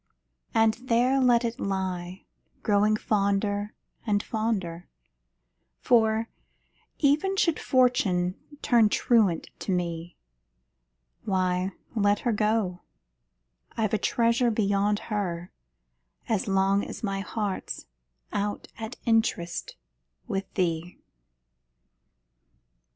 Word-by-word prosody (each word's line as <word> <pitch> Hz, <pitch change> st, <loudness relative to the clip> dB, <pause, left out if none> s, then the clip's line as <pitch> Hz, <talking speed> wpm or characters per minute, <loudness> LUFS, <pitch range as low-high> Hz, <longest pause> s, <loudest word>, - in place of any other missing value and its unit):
And 225 Hz, -1 st, +5 dB
there 250 Hz, +3 st, +3 dB
let 245 Hz, -2 st, +4 dB
it 235 Hz, +3 st, -3 dB
lie, 185 Hz, -3 st, -3 dB, 0.4 s
growing 210 Hz, +1 st, +3 dB
fonder 205 Hz, 0 st, 0 dB, 0.3 s
and, 205 Hz, -2 st, +1 dB
fonder 195 Hz, -7 st, -2 dB, 0.9 s
For, 225 Hz, -2 st, +3 dB, 0.7 s
even 310 Hz, +7 st, +2 dB
should 335 Hz, -4 st, +2 dB
Fortune 200 Hz, -9 st, +2 dB, 0.3 s
turn 235 Hz, -5 st, +5 dB
truant 210 Hz, -8 st, +2 dB
to -, -, -3 dB
me, 170 Hz, -1 st, -3 dB, 1.1 s
Why, 185 Hz, -1 st, 0 dB, 0.2 s
let 205 Hz, -1 st, +2 dB
her 240 Hz, -, +1 dB
go 210 Hz, -4 st, 0 dB, 1.0 s
I've 220 Hz, -2 st, 0 dB
a 215 Hz, -, +2 dB
treasure 235 Hz, +1 st, +2 dB
beyond 205 Hz, -1 st, +1 dB, 0.2 s
her, 180 Hz, -4 st, -2 dB, 0.8 s
As 215 Hz, -3 st, 0 dB
long 195 Hz, +1 st, +2 dB
as -, -, -8 dB
my 195 Hz, -2 st, -1 dB
heart's 205 Hz, -1 st, -4 dB, 0.5 s
out 205 Hz, 0 st, -2 dB
at 225 Hz, +2 st, -5 dB
interest 220 Hz, -7 st, 0 dB, 0.5 s
With 195 Hz, 0 st, -3 dB
thee! 175 Hz, -2 st, -1 dB
205 Hz, 95 wpm, -27 LUFS, 190-230 Hz, 1.1 s, And